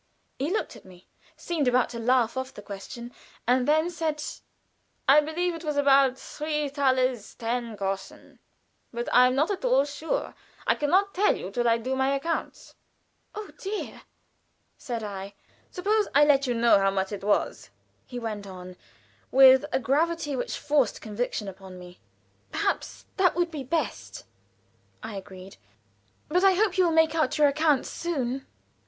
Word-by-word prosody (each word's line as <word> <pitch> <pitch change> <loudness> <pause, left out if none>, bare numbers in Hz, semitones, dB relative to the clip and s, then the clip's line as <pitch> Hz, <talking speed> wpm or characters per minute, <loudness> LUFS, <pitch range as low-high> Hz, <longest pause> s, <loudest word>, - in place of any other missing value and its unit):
He 280 +4 -1
looked 435 - -2
at - - -14
me, 185 -1 -17 0.3
seemed 320 -6 -2
about 250 0 +3
to 235 - -6
laugh 240 0 +2
off 260 0 -4
the 205 - -10
question, 235 +5 -8 0.3
and 250 +1 +3
then 315 +3 +2
said: 315 -3 -2 0.8
"I 290 +3 +7
believe 340 +4 -2
it 330 0 -8
was 300 -2 -2
about 275 -2 +4
three 300 +1 -3
thalers 260 -5 0
ten 235 -1 -3
groschen, 195 -1 -5 0.5
but 235 0 -4
I 250 0 +7
am 255 - 0
not 300 +8 +2
at 395 - -4
all 260 +2 +3
sure. 290 +2 -3 0.3
I - - +4
can 295 - -2
not 395 +4 +3
tell 370 - +1
till 240 +3 0
I 230 0 +4
do 255 +3 -3
my 265 +1 +1
accounts." 330 +4 -4 0.6
"Oh, 425 -1 -7
dear!" 405 +2 -5 0.7
said 235 -4 -5
I. 200 -1 -6 0.3
"Suppose 415 +3 0
I 295 +1 +7
let 280 -2 +3
you 245 - 0
know 230 -3 +5
how 195 0 +3
much 195 0 -2
it 200 -1 -6
was," 205 0 0 0.4
he 245 - -7
went 215 -4 -5
on, 180 -1 -10 0.5
with 265 +1 +7
a - - +2
gravity 295 +3 0
which 245 - -3
forced 285 -6 +1
conviction 215 -1 -3
upon 190 -1 -10
me. 180 0 -13 0.5
"Perhaps - - -2
that 375 -2 +3
would 350 -1 0
be 305 -4 -5
the 260 - -11
best," 325 -1 -3 0.8
I 220 -1 -6
agreed. 190 -1 -10 0.7
"But 360 +5 +1
I 390 -1 +6
hope 395 -1 +1
you 365 - +5
will 335 - +2
make 320 -1 +4
out 310 -5 0
your 300 -1 +5
accounts 295 -1 +1
soon." 270 -6 -3
265 Hz, 170 wpm, -26 LUFS, 230-315 Hz, 0.8 s, I